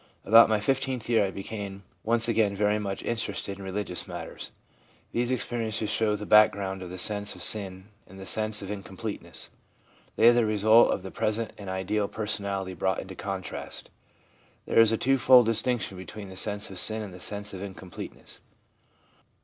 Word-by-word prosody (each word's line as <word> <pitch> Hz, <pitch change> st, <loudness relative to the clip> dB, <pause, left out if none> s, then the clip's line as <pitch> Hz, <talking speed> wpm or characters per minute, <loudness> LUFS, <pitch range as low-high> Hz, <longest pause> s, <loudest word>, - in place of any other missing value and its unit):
About 115 Hz, +3 st, +8 dB
my 110 Hz, -1 st, +2 dB
fifteenth 130 Hz, +1 st, -1 dB
year 115 Hz, -3 st, +4 dB
I 100 Hz, -, 0 dB
became 100 Hz, 0 st, -6 dB, 0.2 s
once 115 Hz, 0 st, +2 dB
again 110 Hz, -3 st, +2 dB
very 105 Hz, +1 st, +2 dB
much 100 Hz, -2 st, -4 dB
interested 100 Hz, -3 st, -3 dB
in -, -, -8 dB
religious 95 Hz, -1 st, -4 dB
matters/ 85 Hz, -1 st, -7 dB, 0.6 s
These 120 Hz, +1 st, 0 dB
experiences 115 Hz, -4 st, -2 dB
show 110 Hz, -2 st, +1 dB
the 105 Hz, 0 st, -6 dB
back 105 Hz, 0 st, +7 dB
ground 95 Hz, -1 st, -4 dB
of 90 Hz, -, -7 dB
the 90 Hz, -, -7 dB
sense 105 Hz, +2 st, +1 dB
of -, -, -7 dB
sin 95 Hz, -2 st, +1 dB, 0.2 s
and 95 Hz, +1 st, -13 dB
the 95 Hz, -, -8 dB
sense 110 Hz, +1 st, -1 dB
of 100 Hz, -, -6 dB
incomplete 100 Hz, +1 st, -6 dB
ness; -, -, -6 dB, 0.6 s
they 115 Hz, -, +5 dB
are -, -, +6 dB
the 120 Hz, 0 st, +3 dB
result 110 Hz, +2 st, +5 dB
of 95 Hz, -, -2 dB
the 95 Hz, -, -7 dB
present 110 Hz, +1 st, -1 dB
and 100 Hz, -2 st, -8 dB
ideal 95 Hz, +2 st, -1 dB
personality 100 Hz, -3 st, -3 dB
brought 95 Hz, 0 st, 0 dB
into 95 Hz, -, -6 dB
contrast. 95 Hz, 0 st, -6 dB, 0.7 s
There -, -, +3 dB
is 115 Hz, -1 st, +7 dB
a 115 Hz, -, +1 dB
two 135 Hz, +3 st, +2 dB
fold 125 Hz, 0 st, +7 dB
distinction 115 Hz, -2 st, 0 dB
between 100 Hz, +1 st, -8 dB
the 95 Hz, -, -10 dB
sense 105 Hz, +1 st, -2 dB
of 95 Hz, -, -5 dB
sin 110 Hz, 0 st, -1 dB
and 100 Hz, -3 st, -8 dB
the 90 Hz, -, -10 dB
sense 100 Hz, +2 st, -5 dB
of 95 Hz, -, -7 dB
incompleteness. 95 Hz, -2 st, -9 dB
105 Hz, 185 wpm, -27 LUFS, 95-110 Hz, 0.7 s, About